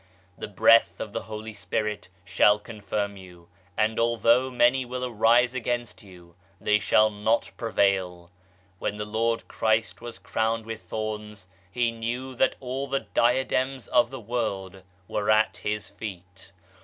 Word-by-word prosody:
The - - -6
Breath 115 +3 +4
of 105 - -6
the - - -2
Holy 110 0 -7
Spirit 105 +1 -3 0.2
shall 100 +2 +4
confirm 105 -2 -4
you, 90 -2 -14 0.3
and 110 +1 +1
although 115 +2 +3
many 125 +1 +3
will 125 +1 -4
arise 120 +1 +3
against 120 -2 -3
you, 90 -4 -16 0.3
they 105 0 +2
shall 110 +2 +4
not 105 +3 0
prevail 95 -6 0
I 90 - -37 0.4
When 105 - -3
the 105 - -3
Lord 115 +2 -1
Christ 110 0 0
was 120 -1 -8
crowned 110 0 -1
with 115 0 -6
thorns, 105 -3 -6 0.2
He 120 +3 +1
knew 120 +3 -4
that 130 +1 +2
all 135 +1 -4
the 135 0 -1
diadems 130 0 0
of 120 -1 +4
the 135 0 -7
world 100 -5 -3 0.3
were 105 -1 -2
at 110 0 +3
His 105 0 -3
feet. 95 -2 -9
110 Hz, 150 wpm, -26 LUFS, 105-120 Hz, 0.4 s, Breath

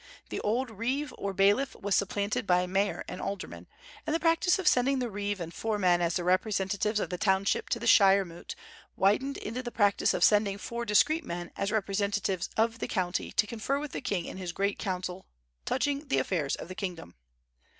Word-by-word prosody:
"The - - -3
old 235 +4 -1
reeve 255 +7 -2
or 200 - -3
bailiff 205 +8 +2
was 200 0 -1
supplanted 200 +1 -1
by 180 0 +3
mayor 195 +2 -1
and - - -6
aldermen, 195 -1 -6 0.4
and 310 - +1
the - - +1
practice 330 +2 +3
of 380 -1 -3
sending 270 -2 +4
the 245 -3 -2
reeve 205 0 -3
and 170 -1 -6
four 220 +2 -2
men 180 -3 +3
as 170 -1 0
the 180 - -1
representatives 195 +3 +1
of - - -3
the 180 - -3
township 195 -1 +1
to - - 0
the - - -5
shire 195 -1 +6
moot 170 -1 -9 0.4
widened 235 +9 +2
into 230 +4 -4
the 245 - -5
practice 205 -4 +2
of - - 0
sending 205 -2 +4
four 235 +3 -5
discreet 310 +10 +3
men 175 -7 -6
as 200 +1 -2
representatives 200 -2 -1
of 230 +1 +1
the - - -3
county 185 -2 -2
to 210 - +3
confer 230 +5 -2
with 290 -1 -5
the - - -5
king 195 -9 -2
in - - -7
his 180 -2 -5
great 200 +2 -1
council 185 -2 -4 0.4
touching 285 +1 -1
the 270 - +1
affairs 155 -7 0
of - - -8
the 185 - -7
kingdom." 180 - -6
200 Hz, 200 wpm, -29 LUFS, 185-235 Hz, 0.4 s, shire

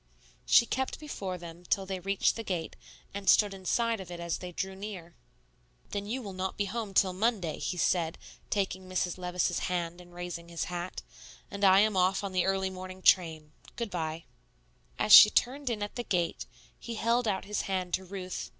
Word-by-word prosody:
She 240 - +7
kept 260 +2 -2
before 195 -12 -5
them 170 0 -10
till 195 +2 0
they 190 -1 -4
reached 195 +2 +1
the 225 - -4
gate, 180 -6 -3 0.4
and 200 -1 -1
stood 205 -2 +5
inside 225 +4 0
of 190 -2 -8
it 175 -1 -7
as 170 -1 -3
they 180 -1 -7
drew 190 +2 -3
near. 190 -4 -8 0.8
"Then 205 0 -3
you 250 +4 -3
will 200 -3 -7
not 185 +1 -3
be 205 - 0
home 210 -1 -5
till 185 -2 +4
Monday," 190 -5 0
he 180 - -3
said, 170 -2 +1 0.3
taking 190 -2 -2
Mrs. 185 -1 -1
Levice's 180 0 0
hand 175 -1 -2
and 175 0 -16
raising 175 -1 -7
his 170 -1 -3
hat; 175 0 -5 0.5
"and 200 0 -5
I 190 0 +7
am 215 -1 +2
off 185 +2 +2
on 200 - -3
the 185 -1 +1
early 190 0 0
morning 185 0 -9
train. 160 -4 +3 0.2
Good 235 -4 -4
by." 160 -1 -3 0.7
As 105 - +3
she 210 - +12
turned 265 +5 0
in 215 -3 -2
at 205 - -5
the 240 - -3
gate, 175 -6 -1 0.3
he 235 - -6
held 235 +2 +1
out 195 -2 -1
his 210 0 -2
hand 185 -2 -2
to 190 - 0
Ruth. 185 -1 -6
190 Hz, 195 wpm, -30 LUFS, 175-205 Hz, 0.8 s, she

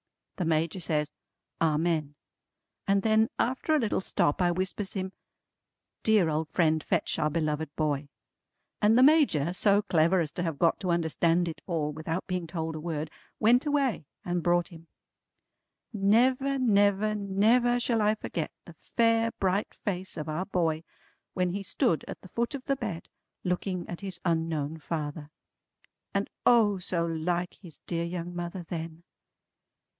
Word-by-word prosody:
The 180 - -1
Major 165 +3 0
says 150 -3 0 0.5
"Amen!" 155 -2 +1 0.7
and 195 0 +3
then 220 0 +3
after 260 +5 +1
a - - +5
little 225 -6 0
stop 145 -3 +1
I 175 - +4
whispers 185 +3 -2
him, 190 -1 -3 0.9
"Dear 215 -6 +4
old 155 0 -1
friend 160 -3 +2
fetch - - 0
our 155 - +2
beloved 155 -1 -1
boy." 145 -2 -1 0.7
And 215 +2 +5
the 255 - +7
Major, 260 - +4
so 205 +2 +3
clever 180 -1 +3
as 160 -3 -1
to - - -4
have 165 -4 -2
got 165 +1 +2
to 185 - -3
understand 170 +1 +2
it 165 - -6
all 160 -4 -1
without 160 +4 -4
being 180 -2 -3
told 160 -1 -3
a - - -4
word, 155 -1 -4 0.3
went 245 +6 +4
away 275 - 0 0.2
and 175 0 -1
brought 175 0 +2
him. 165 -1 -14 1.1
Never 250 +7 +3
never 205 -3 +3
never 215 +5 +2
shall 235 -2 +1
I 210 +1 +3
forget 165 -7 -4 0.2
the 170 - -12
fair 230 +6 +1
bright 195 +2 -1
face 190 -2 -4
of 155 -1 -4
our 155 +4 -2
boy 165 -4 0 0.5
when 180 -1 +1
he 200 +3 -3
stood 170 -4 0
at - - -8
the - - -12
foot 235 +8 -2
of 260 - -8
the 275 - +1
bed, 215 -10 -5 0.4
looking 180 0 -2
at 175 - -7
his 190 -3 -5
unknown 160 -2 -1
father. 150 -1 -4 0.9
And 200 0 +1 0.2
O 215 -5 +5
so 175 -1 -1
like 175 +2 -1
his 170 -6 -8
dear 170 -1 -2
young 175 0 -5
mother 175 +1 -4
then! 165 0 -6
175 Hz, 160 wpm, -28 LUFS, 160-205 Hz, 1.1 s, the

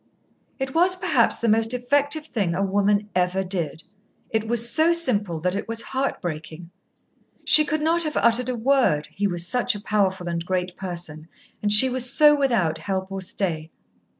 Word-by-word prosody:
It 265 -1 -5
was 360 +3 +3
perhaps 365 - +1
the 235 - -2
most 225 +2 +2
effective 285 +5 -1
thing 200 - -2
a 195 - -1
woman 205 +1 0
ever 180 +1 0
did. 170 -4 -4 0.5
It 220 0 -2
was 235 0 +2
so 320 +7 +2
simple 210 - -1
that 180 +2 -1
it 200 - -5
was 230 0 -4
heartbreaking. 170 - -5 0.7
She 305 - +8
could 305 +1 -2
not 330 +2 +1
have 305 -2 -1
uttered 235 +2 +2
a 250 - -2
word, 235 - +1
he 205 0 -2
was 175 -2 -1
such 245 +4 +1
a - - -6
powerful 195 -3 -1
and 170 -1 -3
great 180 0 -3
person, 170 -4 -7 0.3
and 205 - -1
she 215 +5 +8
was 250 -1 0
so 300 -1 +5
without 235 - 0
help 190 -1 -4
or 195 0 -5
stay. 170 -4 -4
205 Hz, 180 wpm, -23 LUFS, 180-260 Hz, 0.7 s, She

